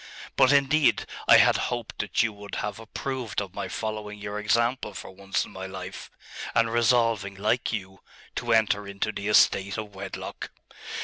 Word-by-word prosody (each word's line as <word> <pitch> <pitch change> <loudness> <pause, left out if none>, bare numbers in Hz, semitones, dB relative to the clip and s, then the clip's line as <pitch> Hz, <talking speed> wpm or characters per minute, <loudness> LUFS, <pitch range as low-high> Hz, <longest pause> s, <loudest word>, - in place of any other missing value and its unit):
But, 130 0 +5
indeed, 140 +1 +3 0.2
I - - +9
had - - +5
hoped 120 -2 -5
that 105 - +1
you 115 -1 -1
would 100 0 -8
have 105 0 -3
approved 115 0 -4
of 100 -3 -5
my - - -4
following 105 -1 -4
your 105 0 -5
example 115 0 +1
for - - -8
once 95 +1 -2
in - - -13
my 95 0 -6
life, 95 -1 -8 0.5
and 115 0 +3
resolving, 115 -4 +2
like 110 +5 0
you, 95 -3 -5 0.4
to - - -1
enter 105 -2 +3
into 100 +2 -2
the 100 -1 -5
estate 100 -1 +4
of 105 -2 -6
wedlock. 95 0 -6
105 Hz, 170 wpm, -26 LUFS, 100-115 Hz, 0.5 s, I